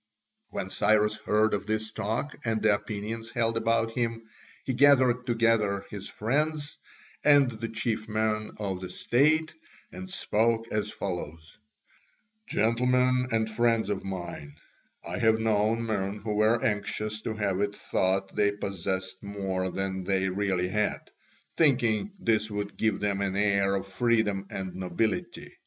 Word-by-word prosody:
When 95 - -4
Cyrus 105 +1 +3
heard 110 +1 +2
of 100 0 -2
this 110 0 -1
talk 110 +7 -2
and 110 -2 0
the 105 -1 +4
opinions 110 +2 -4
held 115 -1 0
about 115 0 +1
him, 115 -1 -2 0.4
he 130 - -2
gathered 130 -2 +4
together 115 -4 +2
his 100 -1 -6
friends 145 +6 -1 0.5
and 145 -3 +6
the 115 0 -5
chief 110 -1 -2
men 110 0 0
of 95 -3 -3
the 90 - -5
state 150 +6 +2 0.4
and 185 0 -8
spoke 115 - +1
as 105 0 -1
follows: 80 -6 -5 0.9
"Gentlemen 125 +3 +2
and 110 -1 +1
friends 115 -1 +1
of 100 - -2
mine, 85 -6 -6 0.5
I 90 +3 -4
have 110 0 +4
known 110 +1 +1
men 100 -2 -2
who 105 +1 -3
were 110 +2 +3
anxious 105 +1 -1
to 110 0 -3
have 100 -3 -1
it 100 0 -1
thought 95 +1 -1
they 100 0 +3
possessed 95 -1 -4
more 95 -2 -2
than 95 0 -3
they 95 0 +1
really 95 -2 0
had, 105 +2 -1 0.5
thinking 135 - +2
this 110 - +1
would 105 -1 -4
give 110 -3 0
them 100 -1 0
an 95 -1 -1
air 100 -1 +2
of 95 - -2
freedom 105 -1 +1
and 95 -1 -5
nobility. 95 +2 -2
110 Hz, 145 wpm, -28 LUFS, 100-115 Hz, 0.9 s, and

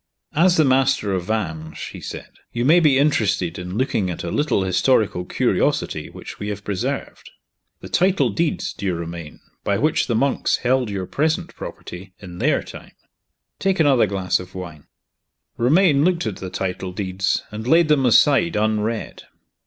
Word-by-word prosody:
"As 175 +3 +4
the 155 - +5
master 130 -6 +2
of 90 -2 -2
Vange," 80 -7 -3
he - - -10
said, - - -8 0.2
"you 120 +1 -2
may 165 +6 +6
be 150 -5 +4
interested 100 - +1
in 90 +2 -5
looking 110 -7 0
at 85 - -5
a 85 - -4
little 145 -9 +1
historical 95 -1 +1
curiosity - - 0
which - - -10
we 105 - -4
have 105 -1 -5
preserved. 100 -3 -4 0.5
The - - -8
title 180 - +2
deeds, 160 +8 -1
dear 95 -4 -2
Romayne, 85 -2 -7 0.2
by 100 - +1
which 155 +6 +1
the 120 - 0
monks 135 +4 +1
held 125 -2 +2
your 100 -2 -3
present 160 - -1
property, 90 +2 -9
in 90 -3 -10
their - - +1
time. - - -12 0.7
Take 195 -1 0
another 140 -8 +4
glass 95 -2 0
of 90 0 -11
wine." 85 -5 -8 0.7
Romayne 145 +3 +4
looked 175 -3 +1
at 110 -4 -3
the 95 - -6
title 90 0 -4
deeds, 95 -1 -1
and 110 +2 -6
laid 165 +3 +5
them 150 -3 +3
aside 145 +7 +4
unread. 110 +1 -1
110 Hz, 165 wpm, -21 LUFS, 95-145 Hz, 0.7 s, may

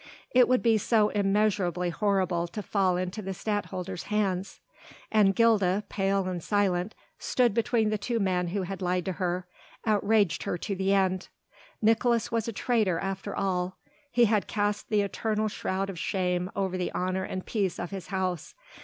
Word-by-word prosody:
It 250 -1 +6
would 255 0 +2
be 225 -2 +4
so 215 0 +3
immeasurably 195 -4 +1
horrible 185 -3 +1
to 210 +4 -6
fall 190 -4 +1
into 185 +4 -3
the 190 -1 -5
Stadtholder's 190 -3 -3
hands. 200 -3 -1 0.5
And 205 -3 +4
Gilda, 210 -4 +3
pale 195 -1 0
and 180 -3 -3
silent, 200 -1 0 0.2
stood 245 -4 +2
between 225 -1 +1
the 215 - -1
two 230 +3 -1
men 180 -3 +1
who 190 +3 -2
had 195 +2 -5
lied 180 -1 0
to 190 - -1
her, 180 0 -2 0.4
outraged 205 -4 +2
her - - -2
to 200 +3 -3
the 190 +1 0
end. 190 -1 +1 0.6
Nicolaes 230 +1 +3
was 230 -1 0
a - - -1
traitor 215 -5 +1
after 195 +2 -4
all; 185 -1 -1 0.3
he 240 -1 +5
had 215 -2 +1
cast 205 0 -1
the 210 -2 +3
eternal 215 +2 -1
shroud 195 -2 -2
of 190 -4 -6
shame 180 -1 -1
over 190 -2 -1
the 180 - -1
honour 185 +1 -1
and 185 0 -5
peace 200 -5 -1
of 175 - -5
his 190 -5 -6
house. 185 -3 -3
195 Hz, 170 wpm, -28 LUFS, 185-215 Hz, 0.6 s, It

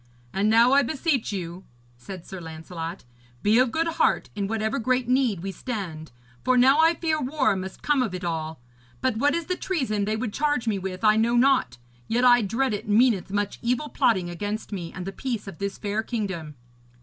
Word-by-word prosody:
'And 200 +2 +1
now 230 +3 +5
I 280 - +6
beseech 275 -2 -1
you,' 180 -2 -5 0.3
said 175 +8 -9
Sir 190 -2 -8
Lancelot, 165 +2 -7 0.4
'be 215 +3 +4
of 255 -1 +4
good 325 +5 0
heart, 330 - +1
in 200 -2 -2
whatever 220 +4 -1
great 255 +1 0
need 250 -8 +1
we 195 - -3
stand, 185 -9 -6 0.3
for 255 0 +3
now 265 +4 +5
I 325 +1 +5
fear 315 -2 -1
war 265 -5 +1
must 190 0 -7
come 295 -3 +2
of 215 -7 -1
it 180 - -6
all. 160 -2 -3 0.4
But 255 -4 0
what 285 +5 +2
is 335 -1 -2
the 365 - -1
treason 255 - -1
they 215 +1 0
would 220 -1 -3
charge 290 -5 0
me 205 -3 +1
with 185 0 -6
I 215 0 +5
know 235 +2 +2
not; 255 - +3 0.3
yet 245 +2 +2
I 245 -1 +7
dread 230 +4 0
it 205 - -4
meaneth 210 -4 +3
much 205 +1 -2
evil 250 +5 -1
plotting 185 -8 +2
against 205 +6 -4
me 175 -5 -5
and 180 - -7
the 195 - -4
peace 230 -1 -4
of 185 -5 -9
this 200 -1 -3
fair 210 +1 -2
kingdom.' 190 -10 -4
220 Hz, 205 wpm, -25 LUFS, 190-255 Hz, 0.4 s, I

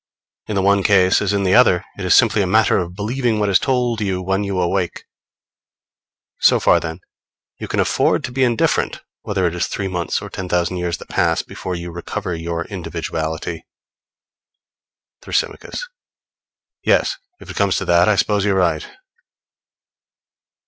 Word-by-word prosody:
In 105 - -3
the 95 - +1
one 100 0 +4
case 95 -2 +4
as 100 -1 0
in 100 -1 0
the 95 -1 +2
other, 95 -5 +5
it 100 - -7
is 90 - +5
simply 110 -3 +4
a 95 - 0
matter 110 +2 +3
of 90 0 -5
believing 115 +3 -1
what 105 -1 +1
is 95 - +4
told 125 -4 0
you 95 -3 -1
when 95 +2 -1
you 100 -2 -2
awake. 90 0 -1 1.4
So - - +5
far, - - +4
then, 80 +2 -6 0.6
you - - -5
can - - -2
afford - - +2
to - - -4
be 130 +1 +1
indifferent 120 -3 +1 0.2
whether 95 -3 -1
it 85 - 0
is 90 - -1
three 100 - -3
months 90 -3 -2
or - - -8
ten 95 -1 -6
thousand 90 +1 0
years 90 -1 -2
that - - -12
pass - - +1
before 90 - -6
you 85 0 -6
recover 90 +2 -5
your 85 0 -4
individuality. 80 +1 -4 1.6
Thrasymachos. - - -3 1.0
Yes, - - +2 0.2
if - - -10
it - - -10
comes 100 -2 +2
to - - -2
that, 85 +3 +4
I 105 - +4
suppose 105 0 +1
you're 100 -1 +1
right. 85 -4 +1
95 Hz, 170 wpm, -19 LUFS, 90-105 Hz, 1.6 s, other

